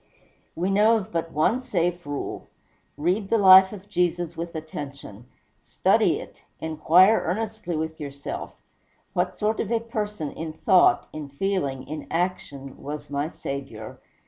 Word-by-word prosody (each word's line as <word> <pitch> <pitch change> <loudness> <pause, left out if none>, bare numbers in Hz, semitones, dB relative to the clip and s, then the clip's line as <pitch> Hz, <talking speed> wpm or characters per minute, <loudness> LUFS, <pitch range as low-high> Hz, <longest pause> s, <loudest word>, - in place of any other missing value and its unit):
We 180 +3 -1
know 215 +3 +5
of 215 0 -6
but 165 0 -2
one 190 - +2
safe 175 - -1
rule: 145 -1 -5 0.5
read 185 +7 0
the 230 - +3
life 190 -2 +8
of 205 -2 -10
Jesus 175 -3 -1
with 170 +1 -6
attention 140 -7 -8 0.3
study - - +2
it - - -12 0.2
inquire 165 +6 +4
earnestly 200 -1 -3
with 160 +1 -4
yourself, 140 -1 -7 0.5
"What - - -1
sort 215 +1 0
of 210 - -1
a 230 - +2
person, 210 -8 -4
in 160 -1 -6
thought, 180 +3 +4
in 150 -2 -6
feeling, 140 -4 -2
in 155 +2 -6
action, 145 -6 -3
was 145 0 -7
my 145 +2 -1
Saviour?" 135 -9 -7
170 Hz, 145 wpm, -25 LUFS, 145-195 Hz, 0.5 s, life